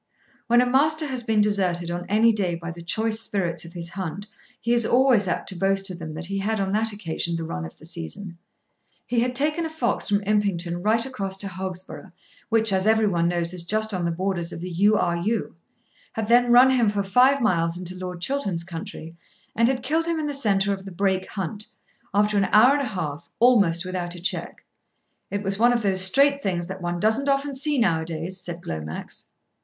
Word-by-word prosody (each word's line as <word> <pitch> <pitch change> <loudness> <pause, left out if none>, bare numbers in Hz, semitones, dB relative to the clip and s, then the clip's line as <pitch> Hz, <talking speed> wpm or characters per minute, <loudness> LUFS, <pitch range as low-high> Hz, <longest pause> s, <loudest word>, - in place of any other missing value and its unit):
When 240 +1 +5
a - - +3
Master 305 +5 +2
has 260 -4 -2
been 220 -2 +2
deserted 180 -5 0
on 175 +1 -4
any 220 +3 +4
day 185 -5 -1
by 170 0 -6
the 170 0 -10
choice 220 +6 0
spirits 185 -7 -2
of 170 - -11
his 170 -1 -5
hunt 190 +1 -5 0.3
he 235 - 0
is 240 -1 +4
always 245 -4 +4
apt 175 - -2
to 190 - -3
boast 195 +1 +1
to 185 -2 -3
them 160 -3 -7
that 165 +2 -5
he 195 +2 -3
had 215 +2 -1
on 195 -1 -1
that 220 +2 +1
occasion 170 -4 -3
the 165 - -3
run 80 - -4
of 80 - -11
the - - -12
season. 170 +2 -6 0.7
He 240 - 0
had 250 +1 0
taken 300 +5 +2
a 320 - -3
fox 315 -9 -1
from 205 0 +1
Impington 190 -4 0
right 225 +2 +2
across 195 -8 -3
to 200 - -3
Hogsborough, 185 0 -7 0.4
which, 225 -2 +2
as 190 +2 +1
every 220 0 +4
one 170 -4 +1
knows, 170 0 -1
is 180 -2 -3
just 215 +4 -1
on 180 -2 -2
the - - +1
borders 175 0 -2
of - - -7
the 180 +2 -6
U. 205 +5 +3
R. 170 -1 0
U., 210 +4 -2 0.6
had 220 -1 -3
then 240 +1 +4
run 250 +2 +7
him 240 -5 +3
for 205 -1 -1
five 250 +8 +4
miles 170 -8 +1
into 180 0 -4
Lord 180 -1 -6
Chiltern's 200 -8 -1
country, 165 -1 -8 0.4
and 230 +1 +3
had 255 -1 -1
killed 320 +5 0
him 335 -1 0
in 310 - -2
the 290 - -2
centre 200 -7 +1
of 190 -1 -6
the 195 - -8
Brake 190 0 -1
Hunt, 205 +2 -4 0.4
after 205 +1 +2
an 195 - +2
hour 235 +8 +6
and 290 - +1
a - - -1
half, 170 - -5
almost 200 -8 +4
without 180 -1 -3
a - - -8
check. 175 - -3 0.7
"It 200 0 -3
was 195 0 -2
one 240 +2 +5
of 235 -2 0
those 190 -2 +3
straight 280 +9 +4
things 175 -5 -1
that 190 +1 -7
one 175 0 -2
doesn't 220 +8 +2
often 275 +1 0
see 285 +2 0
now 175 -10 +2
a - - -5
days," 165 +3 -4
said 175 0 -6
Glomax. 80 - -6
195 Hz, 225 wpm, -24 LUFS, 175-230 Hz, 0.7 s, run